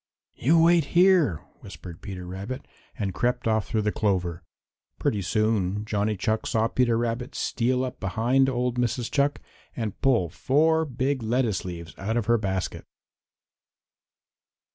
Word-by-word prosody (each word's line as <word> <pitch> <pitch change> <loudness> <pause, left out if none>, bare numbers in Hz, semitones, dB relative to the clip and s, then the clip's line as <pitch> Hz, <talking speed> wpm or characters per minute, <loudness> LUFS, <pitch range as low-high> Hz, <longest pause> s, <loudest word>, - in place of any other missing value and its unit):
"You 155 +7 +3
wait 170 -2 +5
here," 175 - +5 0.2
whispered 85 -2 -10
Peter 90 -2 -7
Rabbit, 100 +9 -6 0.3
and 100 -3 -2
crept 125 +2 0
off 110 -2 +1
through 110 -3 0
the 105 - +1
clover. 90 -6 -1 0.6
Pretty 105 - 0
soon 105 0 0
Johnny 105 -1 -1
Chuck 110 +4 -1
saw 110 0 +2
Peter 120 -1 +2
Rabbit 120 +2 -2
steal 125 +2 0
up 130 0 -7
behind 120 +8 +2
old 125 -1 -1
Mrs. 120 -1 -1
Chuck 145 0 +1 0.4
and 110 -5 -4
pull 120 -10 +3
four 160 - +2
big 135 0 -1
lettuce 115 -3 0
leaves 85 -1 -7
out 110 +4 -1
of 115 - 0
her 120 +1 +3
basket. 95 -3 -3
115 Hz, 140 wpm, -26 LUFS, 100-130 Hz, 0.6 s, wait